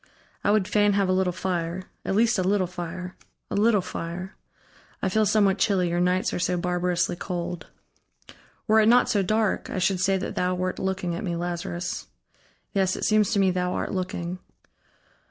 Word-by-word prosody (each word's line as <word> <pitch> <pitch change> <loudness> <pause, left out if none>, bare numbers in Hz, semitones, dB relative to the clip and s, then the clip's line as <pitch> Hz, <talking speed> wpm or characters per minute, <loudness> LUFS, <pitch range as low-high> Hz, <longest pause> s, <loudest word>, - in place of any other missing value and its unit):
I - - +2
would 205 -2 +3
fain 205 -1 +3
have 195 -1 +1
a - - +3
little 185 -1 +2
fire 180 -1 -2 0.2
at 195 - -1
least 225 0 +3
a - - +1
little 190 0 +2
fire, 180 +1 -6 0.4
a - - -1
little 210 0 +4
fire. 180 +2 -6 0.6
I 190 - 0
feel 215 +2 +2
somewhat 200 -2 +3
chilly, 190 -3 +2
your 175 +1 0
nights 180 +1 +1
are - - -2
so 180 0 0
barbarously 180 0 0
cold.... 175 -2 -5 1.0
Were 220 0 +4
it 215 - +4
not 245 +1 +5
so 205 - +2
dark, 215 +2 0
I - - -4
should 185 0 +1
say 195 +1 +2
that 190 - -4
thou 180 0 0
wert 185 0 -2
looking 190 -2 -2
at 170 - -4
me, 175 -4 -2
Lazarus. 175 0 -4 0.7
Yes, 190 -2 +1
it - - -5
seems 215 -2 +3
to 200 - +2
me, 190 -1 +4
thou 180 0 -1
art - - -2
looking.... 185 -1 -3
185 Hz, 190 wpm, -25 LUFS, 180-200 Hz, 1.0 s, not